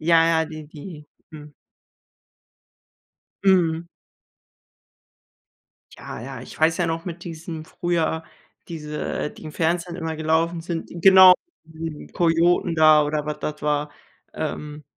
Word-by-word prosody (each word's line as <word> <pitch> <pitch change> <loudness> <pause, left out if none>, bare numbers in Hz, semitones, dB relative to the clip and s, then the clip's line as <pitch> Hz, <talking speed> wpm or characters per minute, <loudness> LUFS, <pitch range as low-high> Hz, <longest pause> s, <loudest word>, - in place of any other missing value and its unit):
Ja, 165 0 +5 0.2
ja, - - +1
die 155 -1 -9
die, 150 0 -11 0.2
mhm. 150 -1 -12 1.9
Mhm. 170 -3 +3 2.1
Ja, - - -8
ja, 130 0 -7
ich - - -12
weiß 160 +1 +3
ja 175 - 0
noch 165 0 -3
mit 170 -1 -7
diesem 165 -1 -7
früher 165 -1 -1 0.5
diese, 150 -2 -4
die - - -14
im 155 - -7
Fernsehen 170 +2 -1
immer 160 -1 -4
gelaufen 160 +2 0
sind 165 -1 -5
genau, 190 -1 +9 0.3
die 160 -1 -7
Kojoten 170 +1 +2
da 155 -1 +6
oder 150 0 -2
was 150 - -4
das 150 -1 -5
war. 150 0 0 0.4
Ähm 150 0 -5
160 Hz, 125 wpm, -23 LUFS, 150-170 Hz, 2.1 s, genau